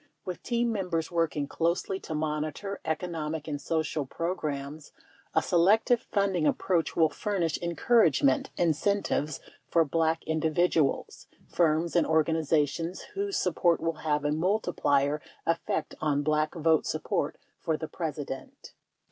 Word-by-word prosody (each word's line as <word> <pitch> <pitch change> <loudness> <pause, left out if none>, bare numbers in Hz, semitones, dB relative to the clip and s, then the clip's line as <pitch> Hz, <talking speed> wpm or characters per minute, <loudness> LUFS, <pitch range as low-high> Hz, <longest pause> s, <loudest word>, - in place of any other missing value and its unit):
With 180 -1 -5
team 235 -1 0
members 180 -6 -2
working 165 -4 0
closely 170 +5 -1
to 160 - -6
monitor 155 +5 -3
economic 160 -1 -3
and 145 -2 -3
social 160 -2 -1
programs 150 -2 -4 0.4
a - - +4
selective 215 +7 +4
funding 195 -6 +2
ap - - +2
proach 175 -4 0
will 160 -2 +4
furnish 175 0 -1
encouragement 170 - +3
incentives 165 -2 0 0.3
for 165 -1 +4
Black 160 +2 +1
in 160 0 -1
dividuals, 160 -2 +1 0.2
firms 165 0 +1
and 170 - +3
organizations 160 +1 +1
whose 400 0 -1
support 175 -1 +2
will 165 -1 -2
have 150 -2 0
a 145 - +2
multiplier 150 -5 +1 0.2
effect 165 -1 -1
on 145 -2 +1
Black 155 +1 +1
vote 160 -1 +2
support - - -1 0.2
for 160 -1 -1
the 160 - -5
President. 150 -6 -6
160 Hz, 130 wpm, -28 LUFS, 150-175 Hz, 0.4 s, a